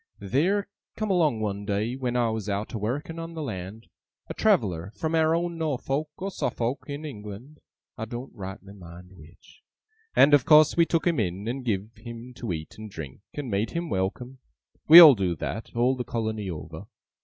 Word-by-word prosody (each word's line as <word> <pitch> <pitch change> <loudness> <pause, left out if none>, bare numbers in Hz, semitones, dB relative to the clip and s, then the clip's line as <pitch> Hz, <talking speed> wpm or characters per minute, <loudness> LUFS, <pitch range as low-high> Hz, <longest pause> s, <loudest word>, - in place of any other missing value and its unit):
Theer 175 - 0 0.3
come 215 -2 -1
along 155 -11 +2
one 100 -1 -3
day, 105 +4 -1
when 125 -2 -3
I 120 -2 +2
was 110 -2 -4
out 100 +2 -3
a 110 - -3
working 145 +10 -3
on 165 0 -7
the 160 - -4
land, 95 -1 -6 0.4
a - - -3
traveller 85 +2 +1
from 160 0 -3
our 160 0 +3
own 170 0 -2
Norfolk 150 0 -2
or 195 +2 -4
Suffolk 120 -6 -2
in 145 +1 -6
England 120 +3 -9 0.4
(I 110 - -3
doen't 120 +4 -7
rightly 95 0 -9
mind 90 -1 -13
which), 80 - -18 0.5
and 145 - +6
of 145 -3 +6
course 155 +1 +6
we 170 -1 +4
took 165 - 0
him 170 -6 +2
in, 95 +1 -2
and 130 +3 -3
giv 110 -1 -3
him 115 +2 -9
to 115 -6 -4
eat 80 +4 -6
and 110 0 -8
drink, 80 -5 -9
and 140 -5 -5
made 100 +3 0
him 170 -1 -3
welcome. 120 +8 -3 0.5
We 165 +3 +12
all 160 -5 +11
do 95 -6 -1
that, 80 +9 -5
all 125 +3 +2
the 125 - -3
colony 110 -4 -3
over. 80 -4 -8
120 Hz, 190 wpm, -26 LUFS, 100-150 Hz, 0.5 s, We